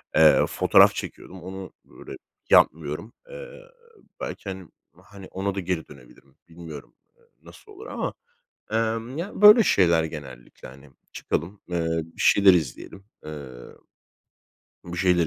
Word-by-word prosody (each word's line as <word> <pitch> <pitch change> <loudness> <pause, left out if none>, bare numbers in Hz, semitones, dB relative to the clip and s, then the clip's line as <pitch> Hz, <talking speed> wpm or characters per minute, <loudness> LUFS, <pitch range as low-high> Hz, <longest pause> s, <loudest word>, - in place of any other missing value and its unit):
Eee, 80 -1 +6
fotoğraf - - +5
çekiyordum, 95 0 -8
onu 95 0 -8
böyle - - -12 0.3
yapmıyorum. 80 +7 +2 0.2
Eee, - - -9 0.7
belki, 100 - -6
hani 95 -3 -8 0.3
hani, 100 -2 -13
ona 95 +1 -3
da - - -2
geri 90 -3 -3
dönebilirim 70 0 -18
bilmiyorum, 80 -4 -11 0.2
eee, 475 - -30 0.2
nasıl 425 - -16
olur 420 +3 -11
ama, - - -4 0.6
emm, 115 +3 -2
ya, 190 +5 -6
böyle 210 +2 +9
şeyler 85 - +3
genellikle, 70 -6 -9
hani, 70 +3 -15 0.2
çıkalım, 90 +6 -4
ııı, 80 -1 -1
bir 80 - -10
şeyler 100 -2 +6
izleyelim, 85 +4 -4 0.2
ııı 70 -5 -10 1.0
bir 85 0 -7
şeyler 90 -2 +2
90 Hz, 130 wpm, -24 LUFS, 80-100 Hz, 1.0 s, böyle